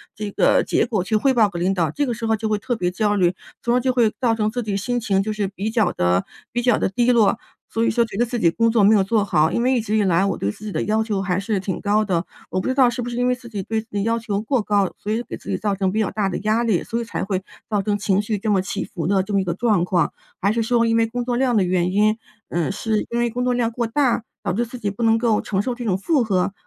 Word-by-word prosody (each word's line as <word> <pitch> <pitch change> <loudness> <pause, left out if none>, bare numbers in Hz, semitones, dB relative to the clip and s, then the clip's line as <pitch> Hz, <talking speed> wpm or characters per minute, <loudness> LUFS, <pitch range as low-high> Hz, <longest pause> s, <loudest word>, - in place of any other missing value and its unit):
这 210 -1 -4
个 - - +3
结 - - +1
果 205 -7 -1
去 215 +3 -1
汇 265 +5 +3
报 220 -5 +4
给 175 -2 -6
领 185 +2 +1
导， 170 -5 +1
这 290 - -1
个 245 - -1
时 230 0 -5
候 220 - +3
就 220 +1 -3
会 210 - +1
特 245 +3 -2
别 180 -5 -1
焦 210 +1 0
虑， 180 -2 +2 0.3
从 240 0 +2
而 250 - +4
就 255 +1 +1
会 235 -4 +3
造 230 -2 +2
成 215 -1 0
自 245 - -2
己 210 -3 -3
心 245 +4 -1
情， 195 -3 +1
就 215 - -2
是 210 -2 -1
比 200 +2 -4
较 220 -6 +2
地 90 +1 +1 0.3
比 240 - -1
较 245 -2 +3
地 - - +1
低 240 +5 +2
落， 230 -1 +3 0.3
所 225 - -1
以 - - +3
说 235 +1 +2
觉 215 - -10
得 240 - +3
自 240 0 -3
己 170 -6 +4
工 230 +3 +2
作 220 -3 +3
没 210 +2 +6
有 195 - +4
做 210 +1 +1
好。 155 -4 +2
因 235 - 0
为 260 +1 +3
一 240 - +1
直 215 0 -1
以 210 - +3
来 185 0 +3
我 200 - -1
对 100 - -1
自 215 - -12
己 210 - -4
的 - - -1
要 220 +1 +1
求 205 -3 -2
还 180 -1 0
是 200 0 -1
挺 190 -1 -3
高 210 +1 +2
的， 175 -2 0 0.3
我 185 - 0
不 - - -4
知 260 - +1
道 260 -3 +5
是 245 +1 -4
不 240 - -4
是 240 - -5
因 245 0 +1
为 250 - +3
自 240 -1 -13
己 200 -4 -4
对 220 +2 -2
自 225 - -21
己 200 - 0
要 230 +1 +1
求 210 -2 -2
过 250 +2 0
高， 205 -2 +1
所 210 - -4
以 230 +3 -1
给 - - -7
自 - - -11
己 - - 0
造 205 -2 -1
成 190 -1 0
比 215 - -1
较 215 - 0
大 200 -2 -1
的 - - -3
压 215 +3 +1
力， 215 -7 +1
所 230 - -3
以 - - -2
才 230 - -4
会 190 -1 -2 0.3
造 205 -2 +1
成 205 +1 0
情 200 -1 +1
绪 210 0 -2
这 210 +1 -1
么 195 - +3
起 195 +1 -3
伏 165 -2 -5
的 195 -1 +2
这 205 - -6
么 195 - +3
一 - - -1
个 175 - -2
状 210 -2 +1
况？ 180 -2 +1 0.3
还 200 +2 +2
是 230 - 0
说 230 +1 +2
因 225 0 +2
为 225 0 +3
工 245 +2 -3
作 245 -1 -1
量 250 -3 +2
的 195 - +4
原 180 0 +1
因， 215 +2 +3 0.3
嗯， 170 +1 -1
是 215 +1 -1
因 235 - 0
为 240 0 +1
工 245 +1 -2
作 250 - +1
量 235 -1 0
过 235 0 -2
大， 245 -2 +1 0.2
导 - - -1
致 235 +5 0
自 245 +2 -9
己 205 -3 -2
不 205 - -8
能 225 0 +4
够 225 -2 +1
承 195 -2 -1
受 245 +4 -2
这 245 - -7
种 190 -3 +1
负 265 - +1
荷？ 195 -2 0
215 Hz, 345 characters per minute, -21 LUFS, 195-235 Hz, 0.3 s, 没